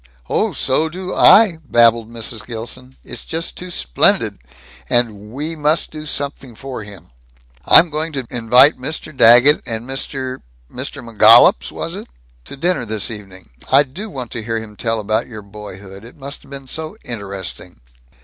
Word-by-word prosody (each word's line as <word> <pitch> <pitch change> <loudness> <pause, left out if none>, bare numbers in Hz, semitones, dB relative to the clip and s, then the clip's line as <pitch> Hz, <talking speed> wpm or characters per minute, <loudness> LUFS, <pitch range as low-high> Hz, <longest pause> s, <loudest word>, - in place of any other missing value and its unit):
"Oh, - - +1
so 150 - 0
do 185 +2 -6
I!" 195 -7 +6
babbled 115 -3 +3
Mrs. 115 -1 -5
Gilson. 125 +3 -8
"It's - - -9
just 165 +1 -5
too 180 - -7
splendid. 60 - +1 0.5
And 105 -3 0
we 150 +6 -5
must 150 +1 0
do 155 0 -8
something 140 -4 -5
for 130 0 -7
him. 100 -9 -14 0.5
I'm 170 -1 +6
going 155 +2 -2
to 135 -3 -4
invite 125 +5 +4
Mr. 155 +2 -5
Daggett 120 +5 +7
and 115 0 -5
Mr. 130 -1 -5 0.3
Mr. 120 - -7
McGollups, 110 - +6
was - - -5
it? - - -8 0.4
to 140 - -9
dinner 175 -1 0
this 110 -1 -2
evening. 95 - -10 0.2
I 135 +2 +6
do 175 +11 -9
want 125 - -7
to 115 - -4
hear 115 +1 -3
him 110 -1 -8
tell 115 +1 -2
about 110 +3 -1
your 110 -4 -10
boyhood. 100 -1 -11
It 120 - -14
must 140 +1 -8
have - - -20
been 135 -1 -9
so 160 +8 -6
interesting." 100 - -7
120 Hz, 165 wpm, -18 LUFS, 110-145 Hz, 0.5 s, Daggett